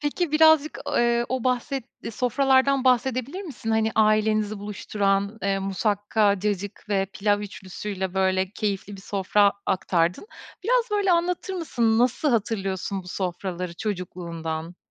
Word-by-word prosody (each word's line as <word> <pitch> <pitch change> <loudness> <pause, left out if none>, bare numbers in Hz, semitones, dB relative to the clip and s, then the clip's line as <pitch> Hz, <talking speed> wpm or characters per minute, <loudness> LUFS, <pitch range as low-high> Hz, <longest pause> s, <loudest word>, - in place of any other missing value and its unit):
Peki 300 +2 -1
birazcık, 315 -1 +5
i - - -1
eee, 235 0 +2
o 255 -2 -2
bahsetti 255 -1 -2
sofralardan 265 +3 +2
bahsedebilir 255 - +1
misin? 250 - -6
Hani 220 0 +2
ailenizi 215 -1 +2
buluşturan, 200 0 -1
eee, 195 0 +1
musakka, 205 +1 +1
cacık 205 0 -3
ve 195 -2 +1
pilav 205 0 +1
ûçlüsüyle, 190 -1 -5
böyle, 190 0 +1
keyifli 205 -1 -3
bir - - -11
sofra 200 +1 +2
aktardın. 180 - 0 0.4
Biraz, - - +2
böyle, 405 -3 +2
anlatır 355 +2 0
mısın? 235 -10 +1
Nasıl 255 +4 +2
hatırlıyorsun 195 -4 -1
bu 180 - -12
sofraları 180 -1 -4
çocukluğundan? 170 -4 -5
210 Hz, 130 wpm, -25 LUFS, 195-255 Hz, 0.4 s, birazcık